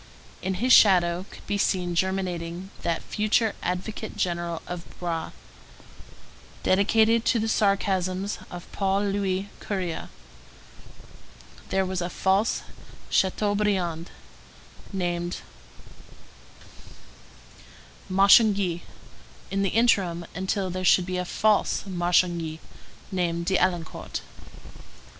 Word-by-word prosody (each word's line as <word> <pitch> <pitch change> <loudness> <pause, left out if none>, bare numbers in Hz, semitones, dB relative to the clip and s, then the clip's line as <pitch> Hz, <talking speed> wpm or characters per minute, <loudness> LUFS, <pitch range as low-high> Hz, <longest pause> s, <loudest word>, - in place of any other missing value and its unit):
In 190 0 -2
his 245 +7 +3
shadow 180 -2 +5
could - - -13
be 205 - -1
seen 180 -3 +1
germinating 180 0 -2
that 165 -1 -1
future 215 +1 +1
advocate 195 +5 -4
general 170 -2 -2
of 175 -1 -6 0.2
Broë, 170 -2 -3 1.3
dedicated 220 +4 +3
to 240 - +3
the 220 0 0
sarcasms 195 -2 0
of 175 -1 -8
Paul 195 0 0
Louis 195 -1 -1
Courier. 185 -5 -4 1.6
There 190 0 +1
was 185 -1 -2
a 175 - -2
false 195 +5 +1 0.5
Chateaubriand, 190 -4 +1 0.8
named 175 -2 -2 2.7
Marchangy, 195 -2 +5 0.7
in 195 0 0
the 195 - +1
interim, 190 -7 +2
until 190 +1 -2
there 185 +1 -4
should 180 0 +5
be 185 0 -3
a 180 - -2
false 215 +3 +1
Marchangy, 175 -3 +1 0.5
named 170 -2 -1
d'Arlincourt. 175 -3 -1
185 Hz, 95 wpm, -26 LUFS, 175-200 Hz, 2.7 s, shadow